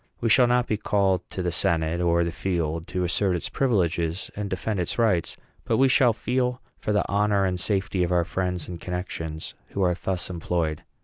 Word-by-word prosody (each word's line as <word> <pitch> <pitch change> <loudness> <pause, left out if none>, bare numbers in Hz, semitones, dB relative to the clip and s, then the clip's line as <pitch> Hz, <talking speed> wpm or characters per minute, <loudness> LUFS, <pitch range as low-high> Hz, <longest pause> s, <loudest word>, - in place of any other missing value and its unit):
We 115 - 0
shall 125 +2 +6
not 125 0 +3
be 110 - -1
called 95 -3 +1
to 95 - -4
the 90 - 0
senate 85 -1 +1
or 85 0 +3
the 85 - -2
field 85 -3 -2
to 90 - -2
assert 90 +2 +1
its 85 - -3
privileges 90 -8 0
and 105 -1 -3
defend 95 +2 -2
its 90 - -2
rights, 105 -8 +1 0.3
but - - +1
we 135 - +5
shall 125 -1 +5
feel, 125 +2 -1 0.2
for - - -2
the 105 -2 +2
honor 100 0 +2
and 90 -1 -1
safety 95 +1 0
of 90 0 +1
our 85 -1 +3
friends 90 -3 -2
and 85 -2 -7
connections 80 -3 -5 0.2
who 100 - 0
are 90 -1 +3
thus 90 0 -2
employed. 85 -3 -2
90 Hz, 200 wpm, -25 LUFS, 85-105 Hz, 0.3 s, shall